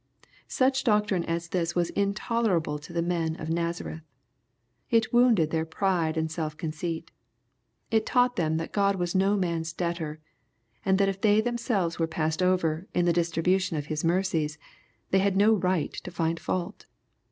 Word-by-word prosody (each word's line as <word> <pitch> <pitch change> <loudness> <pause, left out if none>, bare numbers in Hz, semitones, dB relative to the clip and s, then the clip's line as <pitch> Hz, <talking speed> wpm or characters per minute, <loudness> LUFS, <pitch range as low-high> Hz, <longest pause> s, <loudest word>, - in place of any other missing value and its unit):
— - - -29
Such 265 0 +1
doc 210 -3 +3
trine 190 -4 0
as 170 0 -3
this 175 -1 -1
was 175 -1 +1
intolerahlfi 200 -6 0
Jx^ - - -11
the 170 -1 0
men 165 -2 -1
of 155 0 -5
Nazareth. 170 -1 -3 0.9
It 225 0 +2
wounded 230 -10 +4
their 160 -1 +1
pride 165 -1 0
and 160 0 -1
self 155 -2 -4
conceit. 160 +1 -4 0.8
It 220 -1 +3
taught 245 0 +2
them 160 -5 0
that 165 - -4
God 200 -1 +2
was 175 -2 -2
no 195 +2 +3
man's 165 -3 -2
debtor, 170 -3 -3 0.6
and 190 0 +3
that 200 0 +3
if 195 0 -5
they 210 0 +4
them 240 +1 -1
selves 195 -9 -1
were 165 - +1
passed 160 +1 -1
over 180 -2 +1
in 175 - +3
the 175 - +3
distribution 170 +1 +1
of 145 - -3
His 150 - -3
mercies, 165 -3 0 0.5
they 190 - +4
had 195 0 +1
no 210 +3 +5
right 185 -5 0
to - - -7
iind 165 -1 -1
fault. 185 +3 -4
175 Hz, 175 wpm, -27 LUFS, 160-200 Hz, 0.9 s, no